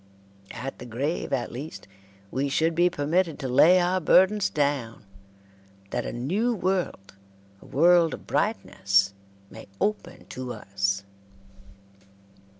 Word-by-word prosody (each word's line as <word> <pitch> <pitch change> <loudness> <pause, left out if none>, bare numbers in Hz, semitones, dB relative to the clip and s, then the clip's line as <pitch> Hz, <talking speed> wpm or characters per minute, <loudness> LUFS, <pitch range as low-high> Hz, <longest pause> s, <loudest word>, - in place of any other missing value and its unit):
At 135 +1 -7
the - - -9
grave, 135 +8 -3
at 130 -3 -1
least, 140 +2 -8 0.4
we 140 +2 -1
should 160 +4 +1
be 175 +2 +3
permitted 165 +1 0
to 135 - -4
lay 155 +9 +6
our 180 +1 +1
burdens 190 +5 +4
down, 140 -8 -2 0.9
that - - -2
a - - -4
new 195 - -1
world, 180 - -2 0.5
a - - -15
world 170 +2 +4
of - - -16
brightness, 100 - +1 0.4
may - - -11
open 210 0 -3
to 125 -1 -6
us. 100 -2 -2
145 Hz, 125 wpm, -26 LUFS, 120-180 Hz, 0.9 s, lay